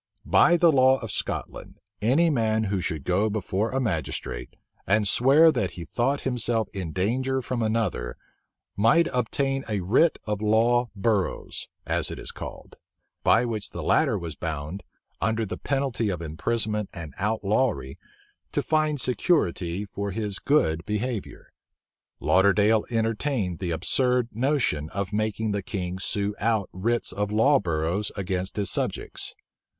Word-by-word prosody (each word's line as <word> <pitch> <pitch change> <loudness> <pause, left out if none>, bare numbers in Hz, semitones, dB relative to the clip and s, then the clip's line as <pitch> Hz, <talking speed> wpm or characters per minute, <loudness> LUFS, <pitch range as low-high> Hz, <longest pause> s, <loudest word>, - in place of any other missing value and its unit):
By 175 -1 +5
the 170 -1 +5
law 130 -1 +5
of 115 -3 -6
Scotland, - - -5 0.2
any 145 +10 +3
man 110 -4 +1
who 100 -3 -1
should 80 -4 -3
go 95 +7 +1
before 105 +1 -1
a 135 - -1
magistrate, 80 - -3 0.3
and 105 +1 +3
swear 140 +10 +6
that 95 -11 0
he 85 - -6
thought 135 - 0
himself 120 -3 0
in 95 -5 -4
danger 130 +9 0
from 125 -1 -3
another, 110 - -1 0.6
might 115 +12 +4
obtain 135 +3 0
a 105 -3 -1
writ 125 - +3
of 105 -1 -2
law 115 +3 +3
burrows, 100 -1 -1 0.2
as - - -1
it - - -6
is - - -4
called; - - -9 0.5
by 120 - +4
which 110 -4 -3
the - - -6
latter 135 -9 +3
was 85 -4 -5
bound, 80 +3 -5 0.4
under 110 0 +1
the 100 - -6
penalty 135 -5 -1
of 90 -4 -2
imprisonment 105 +6 -2
and 80 -6 -8
outlawry, 105 - 0 0.5
to - - 0
find 155 -2 +1
security 105 - 0
for 100 0 -4
his 100 0 -3
good 85 - +2
behavior. 105 +2 -3 0.7
Lauderdale 100 +3 +4
entertained 115 - -1
the 90 -2 -3
absurd 125 +8 +2
notion 120 - 0
of 100 0 -4
making 110 0 -1
the 100 0 -1
king 95 -6 -4
sue 100 +1 -1
out 110 -3 +1
writs 115 +6 0
of 105 +2 -2
law 135 +7 +4
burrows 85 +2 -1
against 95 -1 -3
his 100 -3 0
subjects. - - -3
110 Hz, 145 wpm, -26 LUFS, 95-125 Hz, 0.7 s, swear